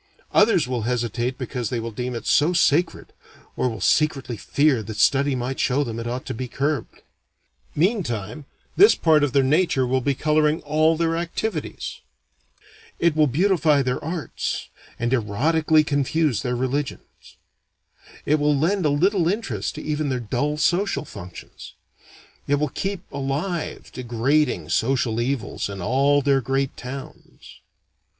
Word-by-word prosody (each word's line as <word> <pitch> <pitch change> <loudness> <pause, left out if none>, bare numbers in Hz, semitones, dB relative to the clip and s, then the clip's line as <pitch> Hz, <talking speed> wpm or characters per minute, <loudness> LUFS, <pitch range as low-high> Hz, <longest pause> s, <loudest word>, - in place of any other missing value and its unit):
Others 210 - +4
will 125 -2 -2
hesitate 120 +1 -2
because 125 -4 -4
they 120 - -2
will 115 0 -5
deem 125 +3 -4
it 115 - -6
so 155 +5 +3
sacred, 170 -1 +1 0.4
or 125 - 0
will 110 -3 -6
secretly 140 -1 +1
fear 140 +3 +1
that 110 0 -7
study 140 +4 +3
might 125 +1 -3
show 140 +3 +2
them 115 -3 -5
it 115 - -5
ought 125 +2 -4
to - - -4
be 125 +3 -5
curbed. 140 +1 -3 0.7
Meantime, 145 - -1 0.3
this 410 +3 +7
part 155 -3 +3
of 145 - +1
their 135 +1 +3
nature 145 -1 +2
will 130 +1 0
be 140 +2 0
coloring 150 +2 +2
all 155 +2 +2
their 165 0 +1
activities. 170 +1 -4 1.0
It 170 -2 +2
will 155 -1 +4
beautify 155 -1 +2
their 125 -1 -2
arts, 165 +1 -4 0.3
and 120 +1 -1
erotically 155 +7 +2
confuse 145 -1 0
their 125 -1 -2
religions. 135 +3 -4 0.9
It 150 +1 +2
will 145 0 +2
lend 175 +3 +1
a - - +2
little 175 +4 +2
interest 145 - -2
to - - -7
even 150 -1 -1
their 130 -1 -1
dull 135 +6 -2
social 175 +2 +1
functions. 90 -7 -11 0.7
It 145 - +3
will 150 0 -1
keep 195 +5 -4
alive 145 +6 -3
degrading 130 +5 0
social 120 -2 +1
evils 125 -4 -2
in 100 -1 -6
all 135 +8 +2
their 135 -1 +3
great 135 +2 -1
towns. 135 +2 -10
140 Hz, 150 wpm, -23 LUFS, 125-155 Hz, 1.0 s, this